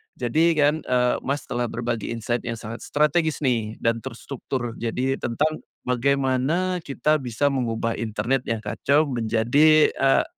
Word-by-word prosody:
jadi 130 +6 +1
kan, 145 0 +4
eee, 125 -3 +1
Mas 140 +2 -1
telah 120 0 -2
berbagi 115 -1 -3
insight 115 +1 -2
yang 115 - -2
sangat 115 +1 -7
strategis 150 +1 +1
nih 115 -4 0
dan 115 0 +2
terstruktur 120 0 -5
jadi 125 +3 -1
tentang 150 +6 -1 0.2
bagaimana 140 +7 +1
kita 155 0 0
bisa 130 +2 0
mengubah 115 -3 -1
internet 115 +4 -1
yang 115 -1 -2
kacau 140 +8 +2
menjadi, 125 +7 +4
eee, 135 0 +3
125 Hz, 140 wpm, -24 LUFS, 115-145 Hz, 0.2 s, kan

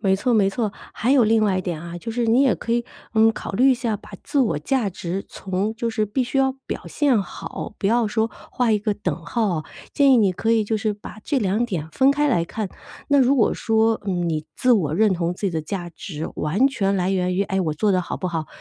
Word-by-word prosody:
没 195 -3 +3
错， 240 +4 +1
没 195 -3 +3
错。 210 0 -2 0.2
还 250 +4 +1
有 255 -5 +5
另 220 0 +3
外 190 -3 +1
一 - - -3
点 170 -3 -4
啊， 170 +1 -7
就 230 +4 -6
是 240 0 0
你 235 +4 +4
也 270 - +4
可 230 - -7
以， 235 0 +1 0.3
嗯， 225 0 +5
考 - - -6
虑 255 +7 +4
一 - - +4
下 235 -4 -2
把 215 - -16
自 285 - -2
我 170 - +1
价 220 - 0
值 180 +1 -4
从 195 +3 -3
就 230 +1 -2
是 220 -1 0
必 225 +6 0
须 250 - -4
要 265 0 +3
表 - - -5
现 275 -8 +2
好， 205 - -7
不 195 - -1
要 230 +2 +3
说 220 +1 0 0.2
画 245 -3 +1
一 215 - +3
个 210 +1 -1
等 180 -6 -2
号 220 +6 0
哦， 165 -5 -1 0.3
建 280 -2 +5
议 - - +6
你 205 -4 +4
可 225 +5 0
以 225 -1 +3
就 220 +1 0
是 215 0 -1
把 210 +1 -10
这 290 - +1
2 210 +1 +1
点 170 -9 -4
分 265 - +4
开 295 +1 +2
来 175 -11 +2
看。 210 +4 -4 0.4
那 285 - +4
如 270 +1 +4
果 225 - +3
说， 225 0 +1
嗯， 175 -3 0
你 155 -2 -2
自 250 -1 +3
我 155 -9 +2
认 210 +2 +3
同 170 0 -1
自 - - -15
己 - - 0
的 160 -2 -2
价 175 +1 -4
值 160 -1 -6
完 190 - +2
全 200 -7 0
来 185 0 0
源 180 -1 0
于 195 - +2
哎， 190 -1 -1
我 160 -4 0
做 210 +7 +1
的 185 -2 +3
好 - - -5
不 185 - -3
好。 165 -2 -3
210 Hz, 275 characters per minute, -22 LUFS, 185-235 Hz, 0.4 s, 议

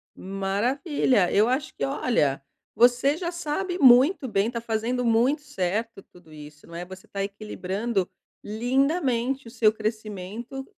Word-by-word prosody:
Maravilha. 200 - 0
Eu 210 +2 +4
acho 260 +4 -1
que, - - -1
olha, 225 - 0 0.3
você 250 +5 +4
já 340 0 -3
sabe 350 +2 -3
muito 265 +3 +6
bem, 200 -2 +1
está 235 0 -4
fazendo 235 +2 -1
muito 240 +6 +2
certo 210 -2 -3
tudo 175 -3 -19
isso, 150 0 -13
não 170 - -11
é? 175 +1 -5
Você 190 +1 -12
está 195 0 -4
equilibrando 200 0 -3 0.3
lindamente 260 +2 0
o - - -10
seu 220 -2 +3
crescimento 215 +3 -5
230 Hz, 140 wpm, -25 LUFS, 195-265 Hz, 0.3 s, muito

